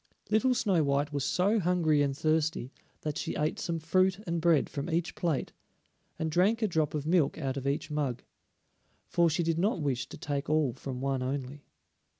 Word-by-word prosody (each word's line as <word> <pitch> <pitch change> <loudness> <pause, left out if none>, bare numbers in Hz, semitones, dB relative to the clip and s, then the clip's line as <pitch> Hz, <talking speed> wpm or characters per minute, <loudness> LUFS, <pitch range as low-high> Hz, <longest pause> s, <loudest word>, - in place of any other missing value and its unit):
Little 250 +4 +3
Snow 195 -8 +2
white 140 +1 0
was 140 -2 -1
so 195 +9 +2
hungry 170 -5 +2
and 140 -1 0
thirsty 155 -4 0 0.3
that 150 -1 -3
she - - -3
ate 150 +1 -1
some 170 -1 -2
fruit 185 +3 +2
and 170 -2 -1
bread 165 -3 +4
from 145 +3 -5
each 175 +1 -1
plate, 165 -6 -1 0.6
and 160 0 -2
drank 205 +8 +2
a - - +3
drop 155 -5 0
of 150 -1 -2
milk 160 -3 +2
out 135 -4 -2
of 135 -1 -3
each 155 +3 -1
mug, 140 -5 -2 0.8
for 170 -1 +2
she 165 +2 0
did 165 0 0
not 195 +1 +1
wish 135 -5 -1
to - - -9
take 145 0 -3
all 155 -5 +2
from 130 0 -6
one 135 -1 0
only. 135 +2 -4
155 Hz, 190 wpm, -30 LUFS, 140-175 Hz, 0.8 s, bread